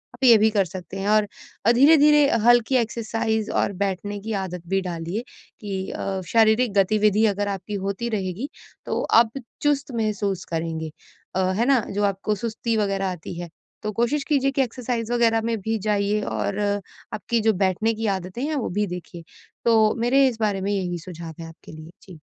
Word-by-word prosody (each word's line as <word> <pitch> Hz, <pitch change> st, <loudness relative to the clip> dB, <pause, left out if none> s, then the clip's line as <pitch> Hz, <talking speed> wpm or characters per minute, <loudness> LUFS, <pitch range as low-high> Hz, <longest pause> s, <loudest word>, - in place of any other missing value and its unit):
आप 260 Hz, -, -10 dB
ये 235 Hz, -3 st, +8 dB
भी 220 Hz, +1 st, +4 dB
कर 200 Hz, -3 st, +2 dB
सकते 185 Hz, +1 st, -8 dB
हैं 195 Hz, -, -3 dB
और 215 Hz, -1 st, +3 dB, 0.4 s
अ, 230 Hz, -, +6 dB
धीरे-धीरे 295 Hz, +2 st, +6 dB, 0.2 s
हल्की 240 Hz, +1 st, +5 dB
एक्सरसाइज़ 225 Hz, -2 st, -1 dB
और 200 Hz, -, 0 dB
बैठने 200 Hz, +1 st, -2 dB
की 220 Hz, +2 st, -4 dB
आदत 180 Hz, -2 st, -5 dB
भी 195 Hz, 0 st, +1 dB
डालिए 175 Hz, +4 st, -4 dB, 0.4 s
कि 195 Hz, -2 st, -4 dB
अ, 195 Hz, -1 st, -3 dB
शारीरिक 225 Hz, +1 st, +3 dB
गतिविधि 210 Hz, +2 st, +3 dB
अगर 205 Hz, 0 st, -1 dB
आपकी 195 Hz, +1 st, -5 dB
होती 200 Hz, +4 st, -2 dB
रहेगी, 205 Hz, +4 st, -3 dB, 0.4 s
तो -, -, -1 dB
आप 230 Hz, 0 st, +4 dB, 0.3 s
चुस्त 290 Hz, -1 st, +1 dB
महसूस 205 Hz, -4 st, -1 dB
करेंगे 160 Hz, -1 st, -3 dB, 0.4 s
अ, -, -, +1 dB, 0.2 s
है 235 Hz, -, +2 dB
ना, 270 Hz, -1 st, +4 dB
जो 205 Hz, +1 st, -1 dB
आपको 200 Hz, +2 st, -1 dB
सुस्ती 230 Hz, +2 st, -2 dB
वगैरह 195 Hz, -2 st, 0 dB
आती 175 Hz, 0 st, -7 dB
है, 175 Hz, -1 st, -6 dB, 0.3 s
तो 215 Hz, -, -2 dB
कोशिश 240 Hz, +7 st, 0 dB
कीजिए 275 Hz, -2 st, +2 dB
कि 275 Hz, 0 st, +1 dB
एक्सरसाइज़ 240 Hz, -1 st, -3 dB
वगैरह 230 Hz, -2 st, +3 dB
में 230 Hz, 0 st, -1 dB
भी 220 Hz, +2 st, -1 dB
जाइए, 205 Hz, 0 st, +1 dB
और 200 Hz, 0 st, -2 dB, 0.5 s
आपकी 215 Hz, +3 st, -1 dB
जो 220 Hz, 0 st, +3 dB
बैठने 215 Hz, +5 st, +1 dB
की 225 Hz, 0 st, -2 dB
आदतें 185 Hz, +7 st, -7 dB
हैं, 310 Hz, +1 st, -2 dB
वो 265 Hz, -, -2 dB
भी 205 Hz, +3 st, -1 dB
देखिए। 175 Hz, -1 st, -8 dB, 0.4 s
तो 220 Hz, -2 st, +4 dB
मेरे 265 Hz, +3 st, +4 dB
इस 230 Hz, -3 st, -8 dB
बारे 205 Hz, -3 st, 0 dB
में 200 Hz, -, -1 dB
यही 180 Hz, -3 st, -2 dB
सुझाव 165 Hz, -1 st, -8 dB
हैं 165 Hz, -, -7 dB
आपके 165 Hz, -, -14 dB
लिए। 155 Hz, +1 st, -11 dB
जी। 180 Hz, -5 st, -13 dB
210 Hz, 185 wpm, -23 LUFS, 190-235 Hz, 0.5 s, ये